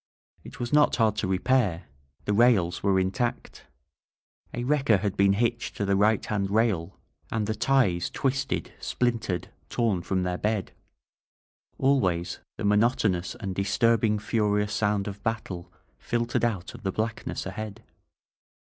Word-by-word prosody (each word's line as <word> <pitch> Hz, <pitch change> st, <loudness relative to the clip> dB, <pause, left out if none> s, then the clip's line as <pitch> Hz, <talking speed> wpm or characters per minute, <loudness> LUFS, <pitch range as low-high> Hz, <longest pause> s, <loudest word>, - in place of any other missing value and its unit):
It -, -, -11 dB
was 120 Hz, +2 st, -3 dB
not 150 Hz, 0 st, +5 dB
hard 110 Hz, -3 st, +2 dB
to -, -, -1 dB
repair 95 Hz, -2 st, +1 dB, 0.2 s
— 70 Hz, 0 st, -37 dB
the 105 Hz, -, +1 dB
rails 100 Hz, -6 st, +3 dB
were 100 Hz, -1 st, +3 dB
intact. 115 Hz, +6 st, -2 dB, 0.8 s
A 120 Hz, -, -4 dB
wrecker 135 Hz, -5 st, +3 dB
had 100 Hz, 0 st, -2 dB
been 100 Hz, -1 st, +4 dB
hitched 115 Hz, +3 st, -1 dB
to 100 Hz, -, -1 dB
the 100 Hz, 0 st, +2 dB
right 105 Hz, +2 st, +3 dB
hand 100 Hz, -2 st, -1 dB
rail 100 Hz, -5 st, 0 dB, 0.3 s
and 110 Hz, -2 st, 0 dB
the 110 Hz, -, -1 dB
ties 110 Hz, -7 st, +2 dB
twisted, 135 Hz, 0 st, -2 dB
splintered, 115 Hz, -7 st, -1 dB, 0.2 s
torn 110 Hz, -7 st, 0 dB
from 95 Hz, +1 st, -1 dB
their 90 Hz, 0 st, -2 dB
bed. 105 Hz, -2 st, -1 dB, 1.1 s
Always 95 Hz, -11 st, +1 dB, 0.2 s
the 105 Hz, -, -3 dB
monotonous 105 Hz, -4 st, +2 dB
and 95 Hz, -1 st, -5 dB
disturbing 105 Hz, +3 st, +2 dB
furious 105 Hz, -1 st, 0 dB
sound 105 Hz, -1 st, 0 dB
of 100 Hz, 0 st, -6 dB
battle 95 Hz, -6 st, -4 dB, 0.3 s
fil 120 Hz, -1 st, -1 dB
tered 115 Hz, -, -1 dB
out 100 Hz, -6 st, -1 dB
of 120 Hz, -, -11 dB
the 95 Hz, -3 st, -1 dB
blackness 110 Hz, +3 st, -3 dB
ahead. 110 Hz, +1 st, -6 dB
105 Hz, 150 wpm, -27 LUFS, 95-115 Hz, 1.1 s, not